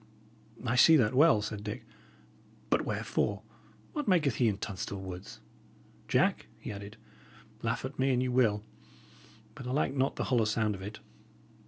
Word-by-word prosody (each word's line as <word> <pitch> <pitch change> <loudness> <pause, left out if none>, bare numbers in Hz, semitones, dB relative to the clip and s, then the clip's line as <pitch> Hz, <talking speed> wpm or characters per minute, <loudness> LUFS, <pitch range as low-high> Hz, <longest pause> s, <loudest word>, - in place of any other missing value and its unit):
"I 120 0 +1
see 160 +5 +8
that 115 -6 +3
well," 140 -5 +5
said 105 -1 -5
Dick. 105 +4 -5 0.9
"But - - +2
wherefore? - - -1 0.5
What 295 -5 -3
maketh 155 - +3
he 120 - +3
in 105 -3 +1
Tunstall 100 0 -5
Woods? 95 0 -8 0.7
Jack," - - +2
he - - -6
added, 100 +1 -8 0.6
"laugh - - -1
at - - -7
me 135 +1 +3
an 125 - +2
ye 130 - +1
will, 115 -5 +2 0.9
but 130 - -8
I - - -2
like 135 0 +1
not 135 0 +1
the - - -2
hollow 120 -4 +2
sound 110 0 +1
of 95 - -8
it." 105 +2 -7
115 Hz, 165 wpm, -31 LUFS, 105-130 Hz, 0.9 s, see